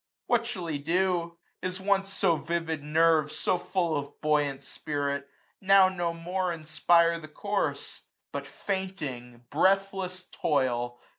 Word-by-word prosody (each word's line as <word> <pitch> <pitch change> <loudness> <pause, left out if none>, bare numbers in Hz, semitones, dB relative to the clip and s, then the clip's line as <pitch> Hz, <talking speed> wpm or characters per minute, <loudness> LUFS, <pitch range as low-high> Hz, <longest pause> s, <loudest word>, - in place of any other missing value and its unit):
What 235 -1 +2
shall 195 -8 -5
he 155 -3 -2
do? 170 +2 0 0.2
His 185 +1 -3
once 195 0 +1
so 185 -3 +2
vivid 165 -1 -2
nerves, 155 0 +3
So 180 - +1
full 180 -2 0
of 145 -1 -5
buoyant 150 -3 +1
spirit, 140 -1 -3 0.3
now 195 -1 +6
no 175 -2 -1
more 175 +3 -3
450 170 -2 -2
Inspire 170 +2 +3
the 155 - -10
course; 200 +6 -3 0.3
but - - -5
fainting 140 - -5
breathless 190 +2 +1
toil. 120 -4 0
170 Hz, 135 wpm, -28 LUFS, 150-190 Hz, 0.3 s, now